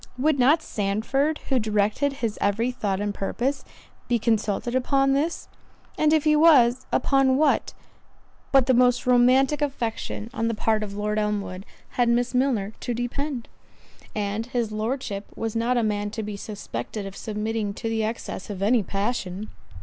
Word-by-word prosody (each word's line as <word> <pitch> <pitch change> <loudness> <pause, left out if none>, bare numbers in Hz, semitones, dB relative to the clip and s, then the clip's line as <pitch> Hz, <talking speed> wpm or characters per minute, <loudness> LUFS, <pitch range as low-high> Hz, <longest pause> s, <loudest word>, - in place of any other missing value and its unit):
—"Would 285 +2 +2
not 295 +6 +4
Sandford, 225 +9 0
who 265 -2 +3
directed 215 +6 +1
his 215 -2 -3
every 225 +5 +1
thought 200 -6 -2
and 205 0 -2
purpose, 260 +8 -2 0.4
be 245 - +2
consulted 220 +1 0
upon 270 +1 +2
this? 305 +5 -1 0.5
and 305 0 +3
if 310 -2 +3
he 305 -1 +4
was, 270 -6 +5
upon 270 -1 +3
what, 305 +1 +2 0.8
but 270 -2 +5
the 260 - +3
most 250 0 +3
romantic 255 +4 +4
affection 235 -5 -3
on 230 -3 -1
the 230 - -1
part 220 0 +1
of 200 -1 -5
Lord 210 +1 -1
Elmwood, 205 -3 -3 0.2
had 245 -1 +1
Miss 245 +1 +1
Milner 245 -6 +1
to 240 - -3
depend? 245 +2 -3 0.7
and 210 +2 -2
his 240 -3 -1
Lordship 215 -2 -3
was 225 -1 -3
not 235 +2 +1
a 235 - +2
man 205 -1 -1
to 220 +1 -5
be 210 0 -5
suspected 200 - -6
of 195 0 -8
submitting 215 0 -3
to 225 - -4
the 225 -1 0
excess 220 -3 -4
of 195 -2 -4
any 230 +3 +4
passion." 200 0 -3
230 Hz, 165 wpm, -25 LUFS, 210-260 Hz, 0.8 s, was